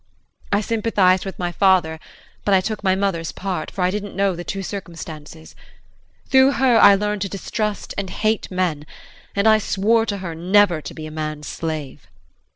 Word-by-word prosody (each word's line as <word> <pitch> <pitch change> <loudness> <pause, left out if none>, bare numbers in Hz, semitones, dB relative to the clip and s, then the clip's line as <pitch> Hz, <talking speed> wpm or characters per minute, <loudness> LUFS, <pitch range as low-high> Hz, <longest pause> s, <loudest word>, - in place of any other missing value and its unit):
I 205 0 +2
sympathized 205 -4 +2
with 195 - -6
my 175 -1 -2
father, 175 -4 +2 0.4
but 200 - +3
I - - +5
took 215 +1 -4
my 190 -1 +3
mother's 190 -4 -1
part, 185 -5 -4
for 190 - -3
I 180 - +2
didn't 205 0 -5
know 195 -1 +1
the 175 - -6
true 195 +2 -4
circumstances. 165 -5 -8 0.7
Through 265 +1 +5
her 260 -4 +3
I 200 - +8
learned 210 0 -2
to 195 - -2
distrust 210 +2 -3
and 195 -2 -4
hate 215 +3 -1
men, 175 -5 -2 0.5
and 200 +2 +2
I 220 0 +6
swore 225 +3 +1
to 200 - -2
her 185 -4 -5
never 180 0 +3
to - - -9
be 155 - -7
a 155 - -8
man's 155 -1 -5
slave. 155 -4 -5
JEAN. 100 - -28
190 Hz, 185 wpm, -21 LUFS, 165-205 Hz, 0.7 s, I